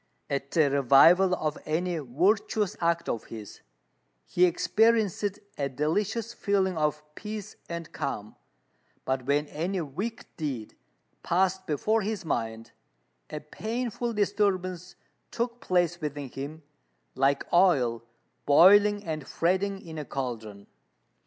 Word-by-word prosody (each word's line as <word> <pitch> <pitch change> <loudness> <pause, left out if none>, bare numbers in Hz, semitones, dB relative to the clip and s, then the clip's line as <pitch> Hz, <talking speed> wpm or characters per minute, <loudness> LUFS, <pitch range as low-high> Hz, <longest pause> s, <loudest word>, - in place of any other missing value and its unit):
At 140 0 -2
the 150 -3 +3
revival 160 +8 +6
of 155 -3 -3
any 170 +2 -1
virtuous 185 - +1
act 170 0 +1
of 115 - -3
his, 110 -3 -10 0.6
he 180 - +3
experienced 210 +2 +2 0.2
a 140 -1 0
delicious 205 - -1
feeling 195 -4 0
of 150 -1 0
peace 210 +3 -7
and 170 -1 -6
calm; 105 -6 -4 0.7
but 130 -1 -2
when 145 +1 +2
any 180 +5 -2
wicked 180 +10 -5
deed 135 -9 -4 0.5
passed 190 +2 +1
before 215 +9 +1
his 210 -2 -3
mind, 115 -5 -3 0.6
a 150 - -5
painful 235 +8 -3
disturbance 190 -3 0 0.3
took 235 0 -3
place 175 -1 +1
within 145 -2 -4
him, 145 +5 -7 0.5
like 135 +1 +1
oil 140 - +4 0.5
boiling 205 +7 +6
and 155 -6 -5
fretting 190 +3 0
in 160 -2 -7
a 150 - -5
cauldron. 110 -7 -5
170 Hz, 120 wpm, -28 LUFS, 140-200 Hz, 0.7 s, revival